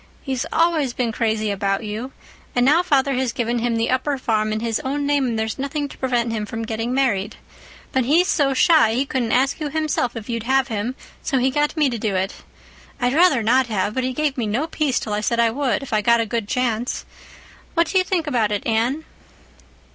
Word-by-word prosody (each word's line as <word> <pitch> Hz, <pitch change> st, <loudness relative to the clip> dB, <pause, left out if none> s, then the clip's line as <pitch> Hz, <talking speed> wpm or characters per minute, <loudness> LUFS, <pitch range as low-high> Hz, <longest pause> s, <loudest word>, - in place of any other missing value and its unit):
He's 265 Hz, -2 st, -2 dB
always 325 Hz, -6 st, +2 dB
been 240 Hz, -2 st, -1 dB
crazy 220 Hz, -2 st, 0 dB
about 195 Hz, +1 st, -1 dB
you—and 245 Hz, +2 st, -4 dB
now 305 Hz, +6 st, +5 dB
father 280 Hz, -6 st, +2 dB
has 255 Hz, -1 st, 0 dB
given 235 Hz, 0 st, -1 dB
him 235 Hz, 0 st, 0 dB
the 225 Hz, +1 st, 0 dB
upper 270 Hz, +2 st, 0 dB
farm 215 Hz, -4 st, 0 dB
in 215 Hz, -, -1 dB
his 225 Hz, -1 st, -1 dB
own 285 Hz, +2 st, -2 dB
name 285 Hz, -2 st, +2 dB
and 230 Hz, -2 st, -1 dB
there's 220 Hz, +2 st, -2 dB
nothing 285 Hz, +2 st, -2 dB
to -, -, -12 dB
prevent 240 Hz, -3 st, 0 dB
him 210 Hz, -2 st, -3 dB
from 225 Hz, +1 st, -4 dB
getting 225 Hz, +1 st, -3 dB
married. 225 Hz, -6 st, 0 dB, 0.6 s
But 260 Hz, -2 st, +1 dB
he's 335 Hz, +7 st, +4 dB
so 280 Hz, -7 st, +2 dB
shy 305 Hz, -8 st, +5 dB
he 265 Hz, +3 st, +1 dB
couldn't 250 Hz, -4 st, -1 dB
ask 270 Hz, +5 st, +2 dB
you 300 Hz, -2 st, -2 dB
himself 305 Hz, -5 st, -1 dB
if 225 Hz, -2 st, -7 dB
you'd 230 Hz, -1 st, -2 dB
have 265 Hz, +3 st, +1 dB
him, 225 Hz, +3 st, -2 dB, 0.3 s
so 275 Hz, -, 0 dB
he 260 Hz, +1 st, +2 dB
got 295 Hz, +4 st, 0 dB
me 300 Hz, -2 st, +4 dB
to 240 Hz, -3 st, -3 dB
do 205 Hz, -2 st, -1 dB
it. 190 Hz, +1 st, -2 dB, 0.6 s
I'd 245 Hz, 0 st, +1 dB
rather 315 Hz, -7 st, +4 dB
not 255 Hz, +3 st, +3 dB
have, 210 Hz, -2 st, -1 dB
but 260 Hz, -, -1 dB
he 255 Hz, -, -1 dB
gave 285 Hz, 0 st, -1 dB
me 225 Hz, -, -1 dB
no 235 Hz, +9 st, 0 dB
peace 305 Hz, -5 st, 0 dB
till 215 Hz, -, -4 dB
I 210 Hz, -, -1 dB
said 235 Hz, +2 st, 0 dB
I 230 Hz, -1 st, +4 dB
would, 265 Hz, -1 st, -1 dB
if 275 Hz, -, -7 dB
I 215 Hz, -, +3 dB
got 235 Hz, +2 st, +4 dB
a 230 Hz, -, +1 dB
good 225 Hz, -1 st, -3 dB
chance. 240 Hz, 0 st, -1 dB, 0.7 s
What 335 Hz, 0 st, +4 dB
do 375 Hz, +4 st, +2 dB
you -, -, +2 dB
think 365 Hz, -3 st, -1 dB
about 235 Hz, -8 st, +1 dB
it, 205 Hz, -, -2 dB
Anne?" 240 Hz, +7 st, 0 dB
250 Hz, 225 wpm, -21 LUFS, 225-275 Hz, 0.7 s, now